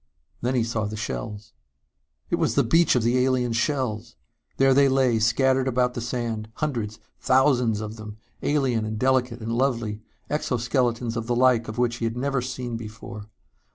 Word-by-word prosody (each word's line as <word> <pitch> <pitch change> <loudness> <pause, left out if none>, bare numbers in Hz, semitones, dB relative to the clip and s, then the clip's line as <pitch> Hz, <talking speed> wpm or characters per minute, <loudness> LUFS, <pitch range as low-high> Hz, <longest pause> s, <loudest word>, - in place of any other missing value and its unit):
Then 125 +2 0
he 120 - +2
saw 115 -2 -2
the 105 +1 -4
shells.... 110 0 -5 0.8
It - - +2
was - - 0
the - - +4
beach 165 -2 +4
of 125 - +2
the 125 +2 +3
alien 125 -2 +1
shells! 120 - -1 0.4
There 135 0 +5
they 140 +1 +5
lay, 130 -4 +3
scattered 130 +4 +2
about 125 -1 +1
the 120 - -4
sand, 115 -2 -3
hundreds, 115 -8 -3 0.2
thousands 125 -5 +3
of 110 +1 -6
them, 105 -1 -9 0.2
alien 135 -6 +1
and 110 0 -3
delicate 125 -1 +1
and 115 +1 -3
lovely, 115 -4 0 0.3
exoskeletons 120 -4 0
the 115 +1 -2
like 125 -2 +3
of 110 - -6
which 120 -1 +1
he 115 - -2
had 115 +1 -2
never 135 0 0
seen 125 -2 -4
before. 110 -1 -9
120 Hz, 170 wpm, -25 LUFS, 110-130 Hz, 0.8 s, There